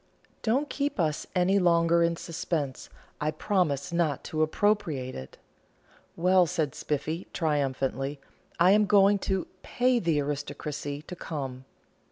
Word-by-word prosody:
"Don't 260 Hz, +6 st, +1 dB
keep 285 Hz, -5 st, -2 dB
us 155 Hz, -3 st, 0 dB
any 185 Hz, +2 st, +3 dB
longer 170 Hz, -1 st, +4 dB
in 170 Hz, 0 st, +2 dB
suspense; 155 Hz, -5 st, -3 dB, 0.3 s
I 150 Hz, -, 0 dB
promise 155 Hz, -3 st, 0 dB
not 165 Hz, -5 st, 0 dB
to 155 Hz, -, -2 dB
appropriate 155 Hz, -6 st, 0 dB
it." 65 Hz, -, -9 dB, 0.8 s
"Well," 180 Hz, +1 st, +4 dB
said 160 Hz, -5 st, -1 dB
Spiffy, 155 Hz, +4 st, -3 dB
triumphantly, 140 Hz, -3 st, -1 dB, 0.4 s
"I 180 Hz, +2 st, +6 dB
am 210 Hz, 0 st, +4 dB
going 200 Hz, 0 st, +5 dB
to 190 Hz, -1 st, -1 dB, 0.2 s
pay 250 Hz, 0 st, +1 dB
the 165 Hz, -7 st, +1 dB
aristocracy 145 Hz, 0 st, -4 dB
to 180 Hz, -, -8 dB
come!" 135 Hz, -6 st, -6 dB
165 Hz, 130 wpm, -28 LUFS, 145-190 Hz, 0.8 s, I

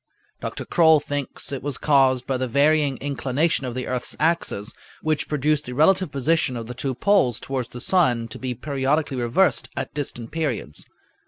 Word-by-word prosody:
Dr. -, -, -5 dB
Croll 160 Hz, -3 st, +5 dB
thinks 145 Hz, -2 st, -3 dB
it 135 Hz, -, -4 dB
was 140 Hz, -2 st, -3 dB
caused 135 Hz, -4 st, +3 dB
by 135 Hz, -, -1 dB
the 130 Hz, 0 st, -2 dB
varying 145 Hz, +1 st, +3 dB
inclination 140 Hz, +2 st, 0 dB
of 120 Hz, -, -5 dB
the 130 Hz, -, -3 dB
earth's 125 Hz, -1 st, -4 dB
axis, 155 Hz, -9 st, 0 dB, 0.3 s
which 155 Hz, -1 st, 0 dB
produced 150 Hz, +1 st, +1 dB
the 125 Hz, -, -6 dB
relative 185 Hz, +6 st, +3 dB
position 140 Hz, -1 st, +1 dB
of 115 Hz, -, -5 dB
the 125 Hz, -, -7 dB
two 130 Hz, +1 st, -3 dB
poles 190 Hz, -, +2 dB
toward 130 Hz, -3 st, -3 dB
the 120 Hz, -, -8 dB
sun 125 Hz, -7 st, +2 dB
to -, -, -8 dB
be 130 Hz, -1 st, -3 dB
periodically 140 Hz, +2 st, -1 dB
reversed 125 Hz, +7 st, +1 dB
at -, -, -4 dB
distant 120 Hz, -5 st, -5 dB
periods. 140 Hz, -, -3 dB
140 Hz, 175 wpm, -23 LUFS, 125-155 Hz, 0.3 s, Croll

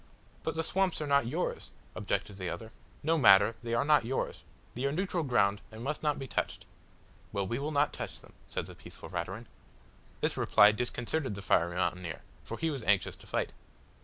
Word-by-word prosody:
"But 160 Hz, -, -2 dB
the 165 Hz, -, 0 dB
swamps 190 Hz, +2 st, +1 dB
are 155 Hz, -, -2 dB
not 140 Hz, -4 st, +3 dB
yours," 160 Hz, +9 st, -2 dB, 0.2 s
objected 100 Hz, -1 st, -2 dB
the 90 Hz, -3 st, -3 dB
other. 110 Hz, 0 st, -6 dB, 0.3 s
"No 160 Hz, +2 st, +3 dB
matter 100 Hz, -2 st, +7 dB
they 115 Hz, 0 st, -1 dB
are 115 Hz, -, +2 dB
not 150 Hz, -2 st, +5 dB
yours. 130 Hz, +4 st, -2 dB, 0.3 s
They 125 Hz, +3 st, -2 dB
are 140 Hz, -, +2 dB
neutral 180 Hz, +2 st, 0 dB
ground, 100 Hz, -7 st, +2 dB
and 110 Hz, +1 st, -8 dB
must 150 Hz, +3 st, -2 dB
not 150 Hz, -1 st, +1 dB
be 135 Hz, -, -5 dB
touched." -, -, -2 dB, 0.7 s
"Well, 100 Hz, -1 st, -1 dB
we 120 Hz, +6 st, -2 dB
will 145 Hz, +2 st, -2 dB
not 145 Hz, -1 st, +2 dB
touch -, -, -5 dB
them," -, -, -18 dB, 0.2 s
said -, -, -2 dB
the -, -, -10 dB
peaceful -, -, -10 dB
Raturan. -, -, -4 dB, 0.7 s
This -, -, 0 dB
reply 105 Hz, +1 st, +6 dB
disconcerted 125 Hz, +3 st, -2 dB
the 100 Hz, -, -7 dB
fiery 85 Hz, +1 st, +2 dB
mountaineer, 90 Hz, -2 st, -2 dB, 0.2 s
for -, -, -6 dB
he 165 Hz, -1 st, 0 dB
was 140 Hz, -4 st, -4 dB
anxious 100 Hz, -2 st, +2 dB
to -, -, -15 dB
fight. -, -, -1 dB
125 Hz, 195 wpm, -31 LUFS, 100-150 Hz, 0.7 s, matter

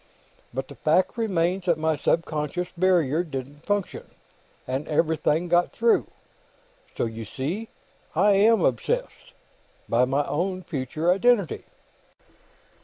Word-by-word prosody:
But 135 Hz, +2 st, -4 dB
the -, -, -10 dB
fact 165 Hz, +4 st, +1 dB
remains 185 Hz, -5 st, 0 dB
that 170 Hz, -3 st, +2 dB
my 160 Hz, 0 st, +1 dB
subconscious 165 Hz, +2 st, -1 dB
barrier 170 Hz, -4 st, +2 dB
didn't 145 Hz, -1 st, -7 dB
function, 205 Hz, -2 st, -2 dB, 0.6 s
and 130 Hz, +3 st, -3 dB
everything 160 Hz, +1 st, +1 dB
got 175 Hz, +1 st, +2 dB
through. 230 Hz, 0 st, +2 dB, 0.9 s
So, -, -, +1 dB
you 115 Hz, 0 st, -5 dB
see, 160 Hz, -, -4 dB, 0.5 s
I 200 Hz, +6 st, +4 dB
am 205 Hz, 0 st, +4 dB
obsessed 120 Hz, -4 st, -2 dB, 0.5 s
by 120 Hz, +2 st, +3 dB
my 140 Hz, +3 st, 0 dB
own 185 Hz, +4 st, -2 dB
future 155 Hz, +4 st, -1 dB
identity." 200 Hz, -2 st, +2 dB
165 Hz, 115 wpm, -25 LUFS, 145-185 Hz, 0.9 s, I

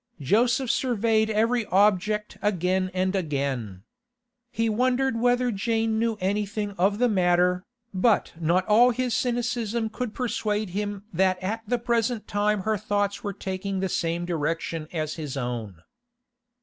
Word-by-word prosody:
Joseph 235 Hz, -, +2 dB
surveyed 225 Hz, -3 st, +1 dB
every 230 Hz, +3 st, +2 dB
object 210 Hz, +2 st, +2 dB
again 185 Hz, -2 st, +1 dB
and 185 Hz, +1 st, 0 dB
again. 135 Hz, -, -2 dB, 0.7 s
He 230 Hz, -1 st, 0 dB
wondered 250 Hz, +2 st, +1 dB
whether 245 Hz, +1 st, +2 dB
Jane 225 Hz, +1 st, 0 dB
knew 225 Hz, -1 st, 0 dB
anything 205 Hz, +2 st, -1 dB
of 195 Hz, +2 st, +1 dB
the 245 Hz, +2 st, +3 dB
matter, 180 Hz, -3 st, +2 dB, 0.3 s
but 200 Hz, +3 st, +2 dB
not 170 Hz, +3 st, +2 dB
all 230 Hz, +4 st, +6 dB
his 250 Hz, 0 st, -1 dB
cynicism 235 Hz, -2 st, -1 dB
could 225 Hz, 0 st, -5 dB
persuade 215 Hz, -5 st, -1 dB
him 205 Hz, +1 st, -3 dB
that 185 Hz, +1 st, +2 dB
at 220 Hz, +4 st, -2 dB
the 245 Hz, -, +1 dB
present 235 Hz, -1 st, -1 dB
time 205 Hz, -1 st, +1 dB
her 215 Hz, +2 st, 0 dB
thoughts 205 Hz, 0 st, -1 dB
were 205 Hz, -, -2 dB
taking 195 Hz, 0 st, -4 dB
the 190 Hz, 0 st, -1 dB
same 170 Hz, 0 st, -1 dB
direction 165 Hz, -1 st, -2 dB
as 155 Hz, -2 st, -3 dB
his 145 Hz, -3 st, -5 dB
own. 115 Hz, -9 st, -4 dB
205 Hz, 140 wpm, -25 LUFS, 180-230 Hz, 0.7 s, all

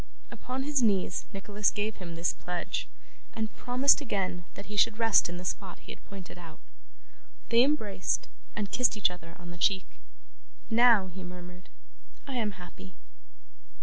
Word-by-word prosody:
Upon 260 Hz, +1 st, -4 dB
his 285 Hz, -1 st, +1 dB
knees 195 Hz, -5 st, +2 dB
Nicholas 205 Hz, +1 st, 0 dB
gave 210 Hz, +1 st, -2 dB
him 170 Hz, -3 st, -7 dB
this 170 Hz, +1 st, +1 dB
pledge, 180 Hz, -1 st, -3 dB, 0.5 s
and 220 Hz, -1 st, -3 dB
promised 260 Hz, +4 st, +4 dB
again 185 Hz, -8 st, -2 dB
that 200 Hz, -, -8 dB
he 210 Hz, -, -7 dB
should 215 Hz, +1 st, +4 dB
rest 225 Hz, -5 st, +4 dB
in 175 Hz, -, -5 dB
the 180 Hz, -, -7 dB
spot 185 Hz, +1 st, -4 dB
he -, -, -11 dB
had -, -, -11 dB
pointed 190 Hz, -3 st, -10 dB
out. 165 Hz, -3 st, -11 dB, 0.9 s
They 235 Hz, 0 st, +6 dB
embraced, 220 Hz, -9 st, +1 dB, 0.3 s
and 205 Hz, -2 st, -2 dB
kissed 250 Hz, -3 st, +3 dB
each 195 Hz, -3 st, +4 dB
other 170 Hz, -2 st, -11 dB
on 175 Hz, -1 st, -9 dB
the 175 Hz, -, -10 dB
cheek. 190 Hz, 0 st, +1 dB, 0.7 s
'Now,' 225 Hz, -5 st, +6 dB
he 190 Hz, 0 st, -7 dB
murmured, 180 Hz, 0 st, -10 dB, 0.6 s
'I 275 Hz, -, -6 dB
am 220 Hz, -4 st, 0 dB
happy. 95 Hz, -, -12 dB
200 Hz, 160 wpm, -30 LUFS, 180-225 Hz, 0.9 s, They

